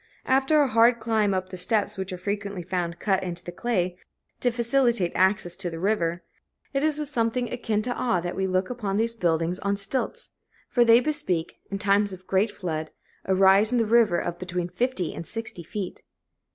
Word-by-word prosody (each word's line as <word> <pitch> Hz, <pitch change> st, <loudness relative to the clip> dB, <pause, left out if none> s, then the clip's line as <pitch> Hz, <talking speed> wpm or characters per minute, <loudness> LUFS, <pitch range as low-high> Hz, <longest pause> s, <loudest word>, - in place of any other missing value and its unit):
After 270 Hz, +4 st, +3 dB
a -, -, +1 dB
hard 235 Hz, 0 st, +5 dB
climb 220 Hz, -3 st, +1 dB
up 185 Hz, -1 st, -2 dB
the 185 Hz, -, -7 dB
steps 210 Hz, +3 st, 0 dB
which 190 Hz, -1 st, -4 dB
are 185 Hz, -, -4 dB
frequently 200 Hz, 0 st, -4 dB
found 175 Hz, -1 st, -2 dB
cut 195 Hz, 0 st, +1 dB
into 175 Hz, -1 st, -5 dB
the 175 Hz, -, -6 dB
clay, 185 Hz, -5 st, -1 dB, 0.4 s
to 245 Hz, -, +2 dB
facilitate 235 Hz, -5 st, +1 dB
access 190 Hz, -2 st, +2 dB
to 190 Hz, -2 st, -3 dB
the 165 Hz, -1 st, -6 dB
river, 175 Hz, -3 st, 0 dB, 0.5 s
it 275 Hz, -, +1 dB
is 305 Hz, 0 st, +1 dB
with 300 Hz, -1 st, -3 dB
something 245 Hz, -2 st, -1 dB
akin 220 Hz, -3 st, -1 dB
to 245 Hz, +1 st, -1 dB
awe 235 Hz, -9 st, 0 dB
that 175 Hz, +1 st, -4 dB
we 190 Hz, 0 st, 0 dB
look 185 Hz, +3 st, 0 dB
upon 205 Hz, -5 st, -2 dB
these 230 Hz, +1 st, +1 dB
buildings 170 Hz, -3 st, 0 dB
on 200 Hz, +1 st, -1 dB
stilts, 250 Hz, -, -3 dB, 0.4 s
for 240 Hz, -, +3 dB
they 230 Hz, +1 st, +6 dB
bespeak, 290 Hz, -, -2 dB
in 195 Hz, -, -3 dB
times 200 Hz, 0 st, +2 dB
of 185 Hz, 0 st, -10 dB
great 195 Hz, +4 st, +2 dB
flood, 160 Hz, -5 st, -4 dB, 0.4 s
a 190 Hz, -, +2 dB
rise 195 Hz, +3 st, +5 dB
in 250 Hz, -, +2 dB
the 230 Hz, -, +2 dB
river 220 Hz, -5 st, +4 dB
of 175 Hz, -, -3 dB
between 180 Hz, -1 st, -3 dB
fifty 190 Hz, -3 st, -1 dB
and 165 Hz, -, -7 dB
sixty 225 Hz, -6 st, -4 dB
feet. 185 Hz, +3 st, -6 dB
200 Hz, 200 wpm, -26 LUFS, 180-235 Hz, 0.5 s, they